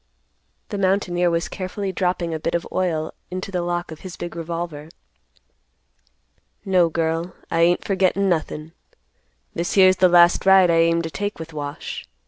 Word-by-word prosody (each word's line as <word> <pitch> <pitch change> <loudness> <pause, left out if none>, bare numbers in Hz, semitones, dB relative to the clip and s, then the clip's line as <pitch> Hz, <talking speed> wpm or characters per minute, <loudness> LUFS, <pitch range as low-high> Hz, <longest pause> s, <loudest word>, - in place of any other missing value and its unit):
The 205 - -4
mountaineer 185 -2 +1
was 170 0 -1
carefully 190 +1 -4
dropping 180 -3 -1
a 160 - -3
bit 165 - -2
of 170 - -2
oil 160 -4 -1 0.2
into 185 +2 -5
the 180 -2 -1
lock 175 0 -3
of 160 - -9
his 185 -2 -9
big 175 -1 -6
revolver. 165 -2 -5 1.8
"No, 180 -3 +3
girl, 165 +2 -2 0.2
I 165 - +1
ain't 175 +1 +3
forgettin' 195 0 +1
nothin'. 160 -2 -2 0.8
This 170 +1 -2
here's 185 -2 +6
the 185 -1 +5
last 175 0 +5
ride 190 -2 +6
I 165 - +3
aim 165 0 +3
to 165 - -5
take 205 +3 -4
with 160 0 -9
Wash. 145 -1 -6
175 Hz, 160 wpm, -22 LUFS, 165-185 Hz, 1.8 s, here's